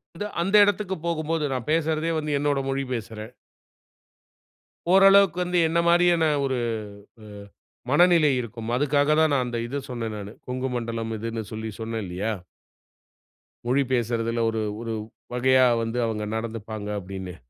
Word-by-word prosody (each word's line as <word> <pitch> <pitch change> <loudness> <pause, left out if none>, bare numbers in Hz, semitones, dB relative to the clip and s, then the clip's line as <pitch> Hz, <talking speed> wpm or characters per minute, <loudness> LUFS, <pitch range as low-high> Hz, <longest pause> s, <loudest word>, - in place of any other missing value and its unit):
வந்து 205 - -4 0.2
அந்த 195 +4 +1
இடத்துக்கு 205 -1 0
போகும்போது, 160 -1 -1
நான் 125 -3 -4
பேசுறதே 160 0 +1
வந்து 150 -1 -2
என்னோட 145 -1 +1
மொழி 135 0 -1
பேசுறேன். 110 0 -6 1.6
ஓரளவுக்கு 195 -2 +6
வந்து 180 0 -1
என்ன 165 +1 +1
மாரியான 175 -1 +4 0.2
ஒரு 130 -2 -1 0.7
அ - - -12 0.7
மனநிலை 165 -1 +5
இருக்கும். 115 -1 -7
அதுக்காக 145 +2 +2
தான் 155 -2 +3
நான் 130 -2 +2
அந்த 120 -1 -4
இது 140 +4 -3
சொன்னேன் 115 -3 -4
நானு. 105 +1 -8
கொங்கு 130 +1 -2
மண்டலம் 115 -1 -3
இதுன்னு 115 +1 -4
சொல்லி 110 0 -4
சொன்னேன் 110 -1 -4
இல்லியா? 95 +5 -3 1.3
மொழி 135 +3 +2
பேசுறதுல 115 -1 0
ஒரு 110 -1 -2 0.2
ஒரு 115 -1 -4 0.4
வகையா 130 +1 +4 0.2
வந்து 115 +2 -3
அவங்க 105 -1 -3
நடந்துப்பாங்க 110 -2 -5
அப்படீன்னு. 95 -1 -7
125 Hz, 135 wpm, -25 LUFS, 115-155 Hz, 1.6 s, ஓரளவுக்கு